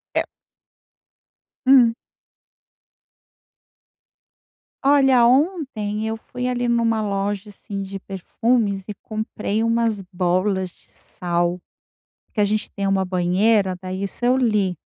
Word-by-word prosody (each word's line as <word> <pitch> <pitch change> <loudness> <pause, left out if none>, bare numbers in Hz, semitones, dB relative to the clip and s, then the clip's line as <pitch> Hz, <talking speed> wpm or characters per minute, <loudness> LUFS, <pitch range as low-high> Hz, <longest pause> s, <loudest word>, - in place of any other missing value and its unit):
É - - +3 1.4
Hum. 255 -3 +6 2.9
Olha, 270 -3 +5
ontem 255 - 0
eu 225 0 -2
fui 250 +2 -5
ali 245 -1 -1
numa 230 -2 +1
loja, 200 +1 -2
assim, 200 0 -6
de 195 0 -6
perfumes 200 +2 -1
e 210 - -6
comprei 215 0 -3
umas 230 -2 +1
bolas 185 +1 0
de - - -25
sal. 175 0 -2 0.7
Que 210 - 0
a - - +4
gente 210 +1 -2
tem 200 -1 -2
uma 195 -1 +1
banheira, 185 +2 +2
daí 185 +1 -5
isso 200 +4 -3
eu 250 +1 +4
li, 210 -8 +1
210 Hz, 115 wpm, -22 LUFS, 190-235 Hz, 2.9 s, Hum